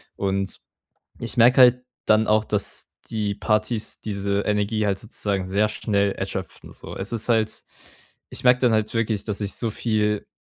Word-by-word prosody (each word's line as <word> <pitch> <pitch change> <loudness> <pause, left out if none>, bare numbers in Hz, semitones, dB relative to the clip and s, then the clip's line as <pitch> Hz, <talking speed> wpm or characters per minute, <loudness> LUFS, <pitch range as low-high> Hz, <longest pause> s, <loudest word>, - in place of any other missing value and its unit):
Und 95 -1 -2 0.6
ich 115 +2 -4
merke 120 +2 +6
halt 125 0 +6 0.2
dann 110 +1 +4
auch, 110 0 +3
dass 105 -2 -1 0.2
die 105 -3 -2
Partys 105 +1 -1
diese 100 -1 -1
Energie 105 +1 0
halt 100 -1 0
sozusagen 100 -3 -3
sehr 100 +3 +2
schnell 100 -2 0
erschöpfen - - -6
so. - - -10
Es 95 +3 -5
ist 115 - -2
halt 110 -2 +1 0.7
ich - - -4
merke 125 0 +6
dann 120 -3 +4
halt 110 +1 0
wirklich, 110 -2 0
dass 105 -2 -1
ich 100 -1 -2
so 115 - -1
viel 105 -2 0
105 Hz, 165 wpm, -23 LUFS, 100-110 Hz, 0.7 s, merke